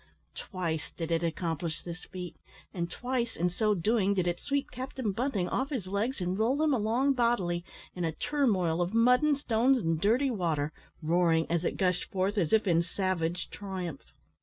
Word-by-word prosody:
Twice 165 -5 -4
did 165 -1 -3
it 165 0 +2
accomplish 165 -1 -2
this 175 0 -7
feat, 180 -3 -7 0.4
and 170 -2 -2
twice, 245 +3 -2
in 175 +2 0
so 210 +3 +1
doing, 200 +2 +2
did 180 -2 +1
it 175 0 -1
sweep 280 0 -2
Captain 255 -3 -3
Bunting 215 -4 -1
off 265 +7 -1
his 255 - -3
legs 205 +7 -1
and 180 +2 -2
roll 245 +6 +2
him 305 -2 +3
along 245 +4 +2
bodily, 235 -9 +1 0.3
in 180 - -4
a 165 - +1
turmoil 185 - +1
of 175 +5 -1
mud 250 +2 +5
and 300 -2 +3
stones 255 0 +3
and 165 -7 0
dirty 250 +7 +3
water, 160 -8 -1 0.3
roaring, 165 0 +3
as 170 0 +1
it - - -1
gushed 180 -2 +1
forth, 195 +2 0
as 165 -5 0
if 220 -1 +4
in 170 -3 +4
savage 175 -1 -2
triumph. 185 -7 -6
185 Hz, 185 wpm, -30 LUFS, 170-235 Hz, 0.4 s, mud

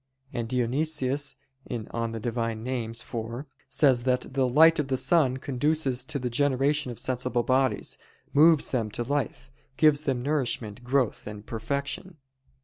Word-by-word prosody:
And 115 -2 -3
Dionysius 135 +2 0 0.3
(Div. 115 -3 -4
Nom. 115 0 -2
iv) 115 +1 -3 0.2
says 135 -5 +4
that 125 0 0
"the 135 -1 +2
light 160 +6 +6
of 145 - 0
the 130 -1 0
sun 135 -4 +3
conduces 135 -1 0
to 140 - -3
the 125 -2 -3
generation 145 +2 +1
of 120 - -8
sensible 125 -1 0
bodies, 130 +1 +1 0.3
moves 155 +1 +5
them 115 -5 0
to 120 - -1
life, 135 0 -3 0.3
gives 150 -2 +5
them 130 -5 -1
nourishment, 125 -6 -2
growth, 125 -3 0
and 105 0 -8
perfection." 140 - -4
130 Hz, 140 wpm, -27 LUFS, 120-145 Hz, 0.3 s, light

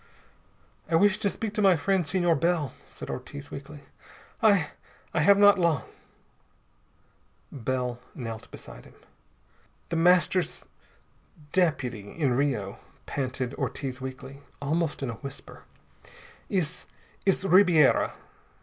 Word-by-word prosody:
"I 165 - +2
wish 205 +4 +4
to 205 -2 +1
speak 215 +1 -4
to 215 - 0
my 195 -3 +6
friend, 185 +1 +1
Senor 175 +1 +2
Bell," 165 -2 0
said - - -8
Ortiz 140 +3 -7
weakly. 140 +1 -9 0.6
"I 200 -9 +4 0.4
I 170 - +1
have 195 +6 +6
not 205 -1 +6
long." 165 -9 +2 1.7
Bell 125 -1 -2 0.2
knelt 115 -3 -6
beside - - -12
him. - - -17 0.9
"The 165 - -1
Master's 180 0 +2 0.8
deputy 125 - 0
in 140 -6 +2
Rio," 120 -7 -1 0.3
panted 130 -2 -3
Ortiz 130 -2 -3
weakly, 130 +1 -8 0.2
almost 150 +1 -1
in 125 - -2
a 115 - -10
whisper, 140 -1 -9 0.8
"is 180 -4 -2 0.4
is 195 0 +2
Ribiera. 180 -6 +5
150 Hz, 115 wpm, -27 LUFS, 130-180 Hz, 1.7 s, my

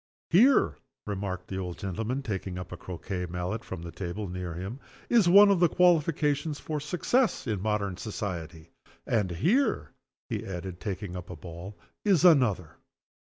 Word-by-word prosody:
Here," 245 +11 +5 0.3
remarked 95 -3 -4
the 95 - -4
old 90 -2 -5
gentleman, 110 +7 -3
taking 95 -5 -4
up 90 -1 -7
a - - -5
croquet 90 +1 -5
mallet 90 +6 -3
from 80 - -7
the 85 - -7
table 95 +3 -5
near 90 -2 -5
him, 95 +9 -6 0.3
"is 225 -7 +5
one 200 +2 +8
of 195 - +3
the 175 -1 +5
qualifications 155 -4 +2
for 155 -1 -3
success 180 - +1
in 105 -6 -2
modern 100 -3 -1
society. 85 -6 -5 0.3
And 105 -5 +1
here," 95 - +1 0.4
he - - -3
added, 90 -1 -6
taking 95 -2 -5
up 90 -1 -7
a 90 - -6
ball, 85 +5 -9 0.3
"is 190 -5 +4
another. 120 - +4
100 Hz, 160 wpm, -28 LUFS, 90-150 Hz, 0.4 s, one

